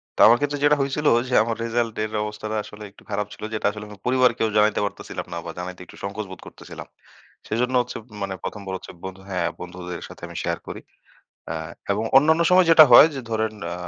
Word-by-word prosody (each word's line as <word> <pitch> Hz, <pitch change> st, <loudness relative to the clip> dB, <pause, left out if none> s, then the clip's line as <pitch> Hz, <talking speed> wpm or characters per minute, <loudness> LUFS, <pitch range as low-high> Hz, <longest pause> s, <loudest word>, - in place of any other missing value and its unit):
তো -, -, -13 dB
আমার 120 Hz, +1 st, +6 dB
ক্ষেত্রে 145 Hz, 0 st, -2 dB
যেটা 145 Hz, 0 st, +5 dB
হয়েছিল 140 Hz, +2 st, -1 dB, 0.2 s
যে 125 Hz, -, -4 dB
আমার 115 Hz, 0 st, -2 dB
রেজাল্ট 115 Hz, -1 st, -1 dB
এর 110 Hz, -, -4 dB
অবস্থাটা 105 Hz, +1 st, -5 dB
আসলে 105 Hz, +1 st, -11 dB
একটু -, -, -20 dB
খারাপ 105 Hz, +1 st, -1 dB
ছিল -, -, -12 dB
যেটা 110 Hz, -, -3 dB
আসলে 105 Hz, 0 st, -8 dB, 0.2 s
পরিবারকেও 125 Hz, -3 st, +3 dB
জানাইতে 105 Hz, 0 st, +3 dB
পারতেছিলাম 100 Hz, -, -6 dB
না 85 Hz, -, -4 dB
বা 85 Hz, -, -5 dB
জানাইতে 90 Hz, 0 st, -7 dB
একটু -, -, -15 dB
সংকোচ 100 Hz, +2 st, -4 dB
বোধ 95 Hz, -, -9 dB
করতেছিলাম। -, -, -11 dB, 0.6 s
সেজন্য 125 Hz, +4 st, -1 dB
হচ্ছে 120 Hz, -, -6 dB, 0.2 s
মানে 100 Hz, -1 st, -3 dB
১ম 105 Hz, -, -5 dB
বার 95 Hz, -, -5 dB
হচ্ছে -, -, -11 dB
বন্ধু 95 Hz, 0 st, -8 dB
হ্যাঁ, 90 Hz, -3 st, -1 dB
বন্ধুদের 90 Hz, -1 st, -7 dB
সাথে -, -, -14 dB
আমি -, -, -12 dB
শেয়ার -, -, -2 dB
করি -, -, -7 dB, 0.7 s
আ -, -, -4 dB, 0.4 s
এবং 105 Hz, +3 st, -1 dB
অন্যান্য 160 Hz, +4 st, +5 dB
সময় 180 Hz, 0 st, +6 dB
যেটা 160 Hz, -1 st, +10 dB
হয় 145 Hz, -, +10 dB
যে 135 Hz, -, -4 dB
ধরেন 110 Hz, 0 st, -1 dB, 0.2 s
আ -, -, -3 dB
110 Hz, 210 wpm, -23 LUFS, 100-130 Hz, 0.7 s, যেটা